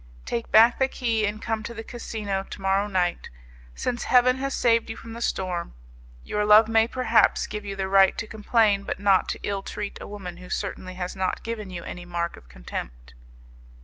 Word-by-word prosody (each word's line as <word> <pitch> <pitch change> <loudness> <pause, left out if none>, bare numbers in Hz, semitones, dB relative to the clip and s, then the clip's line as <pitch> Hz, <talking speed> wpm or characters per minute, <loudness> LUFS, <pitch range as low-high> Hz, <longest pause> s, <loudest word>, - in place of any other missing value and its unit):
Take 235 -1 -3
back 230 +2 +6
the 265 - +4
key 230 -5 0
and 210 +1 -4
come 225 -1 -1
to 235 +2 -7
the 225 - -6
casino 215 -5 -4
to - - -8
morrow 195 +1 +1
night, 180 -3 -1 0.5
since 240 -1 -2
Heaven 255 0 +4
has 275 +1 -2
saved 230 -2 +2
you 225 - -5
from 230 0 -10
the 235 - -8
storm. 180 - -2 0.5
Your 210 0 -1
love 210 +1 +7
may, 225 0 +3
perhaps, 235 -2 +3
give 210 -1 -6
you 200 -1 -4
the 190 -1 -2
right 195 0 +5
to - - -3
complain, 215 -1 +2
but 200 - -5
not 200 -2 +3
to - - -3
ill 200 -1 -2
treat 205 +1 -6
a - - -7
woman 185 -4 -7
who 180 0 -12
certainly 185 -1 -4
has 180 0 -4
not 190 -1 -2
given 220 -3 -5
you 175 -2 -6
any 175 0 -7
mark 170 -1 -3
of 60 - -17
contempt." - - -8
205 Hz, 205 wpm, -25 LUFS, 185-225 Hz, 0.5 s, love